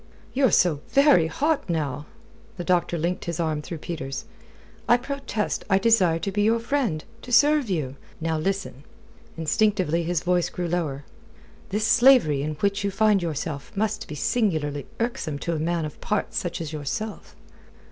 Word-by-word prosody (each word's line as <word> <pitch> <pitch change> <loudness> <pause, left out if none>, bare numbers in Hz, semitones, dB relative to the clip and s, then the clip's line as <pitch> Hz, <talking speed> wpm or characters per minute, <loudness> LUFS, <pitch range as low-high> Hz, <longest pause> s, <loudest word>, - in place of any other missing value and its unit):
"You're 265 -1 +4
so 170 -6 +3
very 275 - +5
hot, 300 - 0
now!" 150 -3 -2 0.5
The 175 - -4
doctor 175 -1 +1
linked 170 +3 -2
his 170 0 -3
arm 155 -2 0
through 165 +2 -6
Peter's. 150 -4 -5 0.6
"I 240 - +7
protest 265 -5 -3
I 190 - +5
desire 195 -6 +4
to 195 +4 -3
be 205 +2 0
your 225 +2 +3
friend 230 - -1 0.2
to 250 - -10
serve 295 -1 +4
you. 140 -7 -2 0.2
Now, 160 -1 -1
listen." 185 -6 -3 0.5
Instinctively 170 0 +1
his 170 0 -1
voice 180 -1 +1
grew 180 -1 -3
lower. 160 -5 -2 0.7
"This 210 +2 0
slavery 240 - +5
in 150 +1 -3
which 200 0 +1
you 200 - +1
find 205 0 +3
yourself 150 -3 -4
must 215 +1 -1
be 150 - -6
singularly 150 - 0
irksome 230 - -2
to 170 +4 -3
a 160 - -2
man 165 0 0
of 150 - -9
parts 210 -1 -2
such 175 -1 -2
as 160 -1 -5
yourself." 205 +9 -5
175 Hz, 165 wpm, -25 LUFS, 155-215 Hz, 0.7 s, I